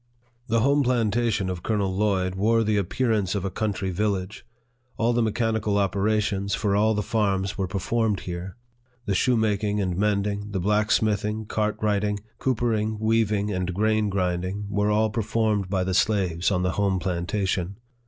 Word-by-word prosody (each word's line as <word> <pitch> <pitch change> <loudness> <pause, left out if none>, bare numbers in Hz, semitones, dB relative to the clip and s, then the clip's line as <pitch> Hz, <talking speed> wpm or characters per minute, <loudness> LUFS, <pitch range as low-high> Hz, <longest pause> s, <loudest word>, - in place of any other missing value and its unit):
The 115 0 +2
home 140 +4 +3
plantation 115 -4 +1
of 90 -2 -4
Colonel 100 -3 -1
Lloyd 95 -3 +1
wore 110 +4 +2
the 110 -1 +1
appearance 105 -1 0
of 100 -1 -2
a 95 - -2
country 100 -3 -2
village. 100 0 -2 0.5
All 115 +1 +2
the 120 - +2
mechanical 110 -2 0
operations 100 0 0
for 100 -3 0
all 110 +2 +3
the 105 - -1
farms 100 -3 0
were 95 -3 -2
performed 105 +3 -1
here. 90 +3 -6 0.5
The 100 - 0
shoemaking 105 -2 +1
and 90 -3 -1
mending, 100 +1 -1
the 95 - 0
blacksmithing, 105 +1 +1
cartwrighting, 105 -1 0 0.2
coopering, 110 -4 0
weaving, 110 -2 +1
and 90 -1 -2
grain 110 +1 +1
grinding, 90 +1 -2
were 105 0 +1
all 110 +1 +2
performed 110 -3 0
by 95 -1 0
the 95 0 -2
slaves 95 -4 +1
on 90 -3 0
the 90 - +1
home 100 -2 0
planta 90 +2 -2
tion. 95 +1 -2
105 Hz, 155 wpm, -25 LUFS, 95-110 Hz, 0.5 s, home